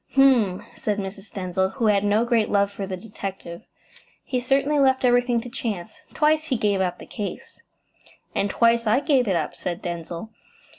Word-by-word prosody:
"H'm!" 250 Hz, -9 st, +4 dB
said 210 Hz, -1 st, -2 dB
Mrs. 195 Hz, +1 st, -6 dB
Denzil, 190 Hz, 0 st, -1 dB
who 245 Hz, -4 st, -1 dB
had 205 Hz, -2 st, +3 dB
no 210 Hz, +3 st, +2 dB
great 235 Hz, -3 st, +2 dB
love 200 Hz, -1 st, +2 dB
for 200 Hz, -1 st, -5 dB
the 185 Hz, -1 st, -4 dB
detective. 195 Hz, -3 st, -7 dB, 0.6 s
"He 255 Hz, -, -1 dB
certainly 275 Hz, +4 st, +1 dB
left 265 Hz, -1 st, +3 dB
everything 245 Hz, -1 st, +3 dB
to 245 Hz, -, -8 dB
chance. 230 Hz, -, -5 dB, 0.2 s
Twice 310 Hz, +1 st, +3 dB
he 260 Hz, -5 st, 0 dB
gave 205 Hz, -3 st, +1 dB
up 180 Hz, -1 st, -1 dB
the -, -, -11 dB
case.". 205 Hz, -2 st, -7 dB, 0.7 s
"And 200 Hz, -, 0 dB
twice 230 Hz, +1 st, +3 dB
I 220 Hz, +5 st, +4 dB
gave 270 Hz, -6 st, +2 dB
it 190 Hz, -, +2 dB
up," 155 Hz, -3 st, -1 dB
said 175 Hz, -1 st, -4 dB
Denzil. 170 Hz, +4 st, -5 dB
215 Hz, 180 wpm, -24 LUFS, 190-250 Hz, 0.7 s, H'm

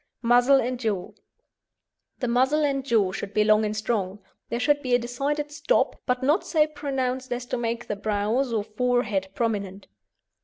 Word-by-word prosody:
MUZZLE 245 Hz, +3 st, +5 dB
AND 250 Hz, +1 st, -3 dB
JAW 210 Hz, -6 st, -2 dB, 1.1 s
The 250 Hz, -, 0 dB
muzzle 260 Hz, +6 st, +2 dB
and 275 Hz, -1 st, 0 dB
jaw 220 Hz, -7 st, +2 dB
should 200 Hz, +1 st, -6 dB
be 210 Hz, -, +4 dB
long 215 Hz, 0 st, +4 dB
and 215 Hz, 0 st, -2 dB
strong. 205 Hz, -3 st, -1 dB, 0.3 s
There 235 Hz, -, -2 dB
should 290 Hz, +3 st, +2 dB
be 250 Hz, -2 st, +2 dB
a -, -, +5 dB
decided 280 Hz, +5 st, -3 dB
"stop," 295 Hz, +11 st, +1 dB
but 250 Hz, 0 st, 0 dB
not 300 Hz, +8 st, +3 dB
so 310 Hz, -3 st, +3 dB
pronounced 265 Hz, -4 st, -3 dB
as 245 Hz, 0 st, -3 dB
to 250 Hz, -, -3 dB
make 235 Hz, 0 st, -2 dB
the 210 Hz, -, -3 dB
brows 215 Hz, +5 st, 0 dB
or 220 Hz, -3 st, 0 dB
forehead 215 Hz, -3 st, 0 dB
prominent. 200 Hz, -4 st, -2 dB
245 Hz, 175 wpm, -25 LUFS, 215-270 Hz, 1.1 s, MUZZLE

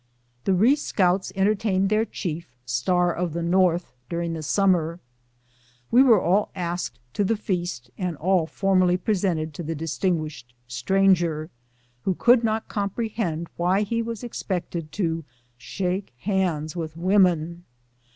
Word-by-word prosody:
The 190 Hz, -, +3 dB
Ree 230 Hz, +10 st, +5 dB
scouts 190 Hz, -9 st, +1 dB
entertained 195 Hz, -1 st, +2 dB
their 215 Hz, +1 st, +2 dB
chief, 170 Hz, -, -5 dB
Star 175 Hz, +9 st, +1 dB
of 175 Hz, -2 st, -2 dB
the 170 Hz, 0 st, -2 dB
North, 175 Hz, -1 st, +2 dB, 0.2 s
during 170 Hz, 0 st, -2 dB
the 160 Hz, -, -4 dB
summer. 170 Hz, 0 st, +1 dB, 0.9 s
"We 245 Hz, -, +7 dB
were 240 Hz, -6 st, +6 dB
all 195 Hz, +4 st, +2 dB
asked 170 Hz, -9 st, -3 dB, 0.2 s
to 205 Hz, -, +1 dB
the 220 Hz, +3 st, +1 dB
feast, 175 Hz, -, -3 dB
and 180 Hz, -4 st, -2 dB
all 175 Hz, +1 st, +2 dB
formally 185 Hz, -1 st, +2 dB
presented 180 Hz, -6 st, -1 dB
to 160 Hz, -, -6 dB
the 165 Hz, 0 st, -3 dB
distinguished 155 Hz, -5 st, -2 dB
stranger, 165 Hz, +4 st, +1 dB, 0.5 s
who 190 Hz, +5 st, 0 dB
could 240 Hz, +4 st, +5 dB
not 220 Hz, 0 st, 0 dB
comprehend 200 Hz, -5 st, -2 dB
why 185 Hz, +4 st, +2 dB
he 230 Hz, +3 st, -1 dB
was 230 Hz, 0 st, -5 dB
ex 240 Hz, -, -5 dB
pected 170 Hz, -4 st, -3 dB
to 165 Hz, -1 st, -2 dB, 0.4 s
shake 185 Hz, +7 st, -3 dB
hands 175 Hz, -, -1 dB
with 160 Hz, -2 st, -5 dB
women. 175 Hz, -2 st, +2 dB
180 Hz, 140 wpm, -24 LUFS, 165-195 Hz, 0.9 s, We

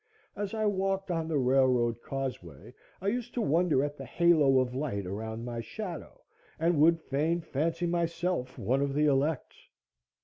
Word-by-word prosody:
As 205 Hz, +1 st, -4 dB
I 215 Hz, -1 st, 0 dB
walked 195 Hz, -1 st, 0 dB
on 165 Hz, -2 st, -1 dB
the 160 Hz, -2 st, 0 dB
railroad 125 Hz, -3 st, +2 dB
causeway, 125 Hz, -, -6 dB, 0.3 s
I 195 Hz, -, +1 dB
used 245 Hz, +2 st, -3 dB
to 245 Hz, -, 0 dB
wonder 165 Hz, -4 st, +2 dB
at 145 Hz, 0 st, -3 dB
the 135 Hz, -, -7 dB
halo 155 Hz, -3 st, +4 dB
of 130 Hz, -1 st, +1 dB
light 125 Hz, -8 st, -2 dB
around 110 Hz, +4 st, -5 dB
my 120 Hz, -1 st, -4 dB
shadow, 175 Hz, -, -7 dB, 0.4 s
and 165 Hz, -1 st, +2 dB
would 165 Hz, +1 st, +5 dB
fain 155 Hz, +3 st, 0 dB
fancy 165 Hz, +2 st, -2 dB
myself 170 Hz, -5 st, -1 dB
one 130 Hz, +3 st, 0 dB
of 140 Hz, -1 st, -1 dB
the 150 Hz, +1 st, +3 dB
elect. 145 Hz, +1 st, +1 dB
150 Hz, 165 wpm, -29 LUFS, 130-175 Hz, 0.4 s, would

